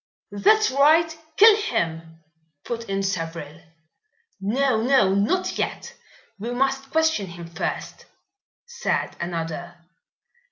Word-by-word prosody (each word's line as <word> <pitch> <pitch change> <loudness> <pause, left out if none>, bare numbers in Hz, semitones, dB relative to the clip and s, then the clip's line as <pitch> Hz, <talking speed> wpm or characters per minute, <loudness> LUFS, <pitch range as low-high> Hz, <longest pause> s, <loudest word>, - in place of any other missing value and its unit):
"That's 430 - +3
right, 315 +4 +4 0.2
kill 435 +1 +8
him!" 165 - -3 0.4
put 230 -2 -5
in 195 0 -1
several. 165 -4 -4 0.8
"No! 225 +4 +1
no! 240 -6 +3
not 210 - 0
yet. - - -3 0.5
We 225 +4 -5
must 270 +1 0
question 320 -11 +1
him 170 -1 -9
first," 165 -1 -5 0.6
said 480 0 -2
another. 170 0 -5
210 Hz, 105 wpm, -23 LUFS, 170-280 Hz, 0.8 s, kill